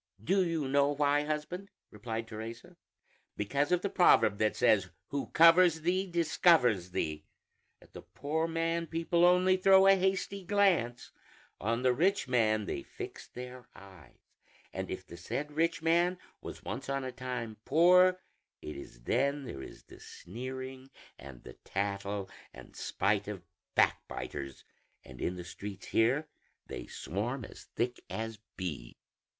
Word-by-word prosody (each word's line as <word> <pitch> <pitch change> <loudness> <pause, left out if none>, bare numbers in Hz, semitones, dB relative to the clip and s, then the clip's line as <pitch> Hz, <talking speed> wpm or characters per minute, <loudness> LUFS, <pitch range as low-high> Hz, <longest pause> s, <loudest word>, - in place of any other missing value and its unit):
"Do 190 - +3
you 165 -5 -1
know 140 +1 +3
why, 145 0 +2
husband?" 155 +6 -4 0.2
replied 110 +1 -5
Teresa; 115 +1 -8 0.6
"because 140 - 0
of 180 0 +2
the 200 - 0
proverb 110 - +5
that 110 0 +2
says, 100 -4 +3 0.2
'Who 140 0 -3
covers 165 0 +6
thee, 185 +3 0
discovers 160 - +3
thee.' 75 -3 -3 0.5
At - - -21
the - - -9
poor 160 +3 -2
man 165 0 -1
people 165 +1 +1
only 180 +1 +5
throw 190 +1 +6
a 195 - +8
hasty 190 +1 -1
glance; 180 - +1 0.5
on 115 +4 -1
the 130 -1 +4
rich 175 +1 +1
man 110 -4 +2
they - - -3
fix - - -9
their 125 0 -9
eyes; 95 -9 -15 0.6
and - - -4
if - - -5
the 85 - -11
said 130 - -4
rich 165 +2 0
man 175 +2 +3 0.2
was - - -9
once 135 - -5
on 135 0 -1
a 130 - -4
time 125 -4 -5
poor, 180 +5 +5 0.4
it 75 - -7
is - - -11
then 140 - +1
there 95 - -7
is - - -11
the - - -15
sneering 130 +5 -8 0.3
and 70 -3 -11
the - - -10
tattle 100 0 -3 0.3
and - - -13
spite 100 0 0
of 95 -4 -6 0.3
backbiters; 70 -2 -1 0.4
and - - -11
in 90 - -1
the 90 - -7
streets 100 +2 -8
here 125 +7 +2 0.4
they - - -7
swarm 115 +7 -4
as - - -13
thick 120 +1 -1
as 110 -1 -5 0.2
bees." 80 -10 -5
130 Hz, 150 wpm, -31 LUFS, 105-165 Hz, 0.6 s, a